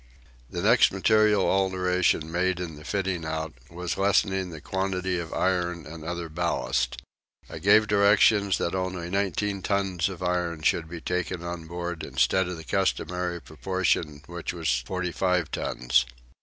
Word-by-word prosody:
The - - -4
next - - +5
material 110 -2 +3
alteration 90 -4 +1
made 90 +1 0
in 90 -3 -4
the 75 - -12
fitting 95 -2 -2
out 80 -1 -3 0.2
was 90 +2 -4
lessening 95 -1 +2
the 80 -2 -8
quantity 95 +1 -2
of 85 -2 -6
iron 90 -3 0
and 80 +2 -9
other 85 0 -4
ballast. 80 -6 -1 0.5
I - - -8
gave 105 +3 +5
directions 100 -1 +4
that 85 - -1
only 90 -2 -3
nineteen 100 +1 -1
tons 95 -3 0
of 90 -1 -7
iron 90 -3 -1
should 80 0 +1
be 85 -1 -7
taken 90 -1 -2
on 85 -1 -5
board 85 0 -4
instead 95 -1 +1
of 90 -1 -5
the 80 - -9
customary 90 -2 -1
proportion 80 -1 -1
which 85 0 -5
was 80 -7 0
forty 90 -1 -2
five 90 -2 0
tons. - - +1
90 Hz, 155 wpm, -26 LUFS, 85-95 Hz, 0.5 s, next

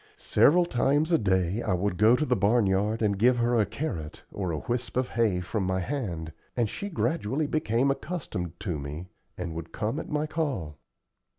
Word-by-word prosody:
Several 175 +4 +4
times 145 +3 +1
a 165 - +4
day 95 0 +1
I 100 - 0
would 90 0 -1
go 110 +3 +6
to 155 - 0
the 125 - +2
barn 105 +2 +3
yard 105 +4 +1
and 100 -2 +1
give 125 +3 +4
her 120 0 +2
a 105 - +2
carrot 100 - -5
or 95 -3 -3
a 80 - -2
whisp 120 +1 -3
of 130 0 +1
hay 110 -6 +1
from 95 +3 -2
my 95 0 0
hand, 90 - -3 0.2
and 120 -2 +2
she 200 - -5
gradually 155 - 0
became 135 -3 +1
accustomed 110 - -4
to 90 -8 -2
me, 75 +6 -6 0.3
and 85 -2 -4
would 80 0 -7
come 110 +8 -2
at - - -7
my 150 0 0
call. 135 - -3
110 Hz, 195 wpm, -27 LUFS, 90-135 Hz, 0.3 s, go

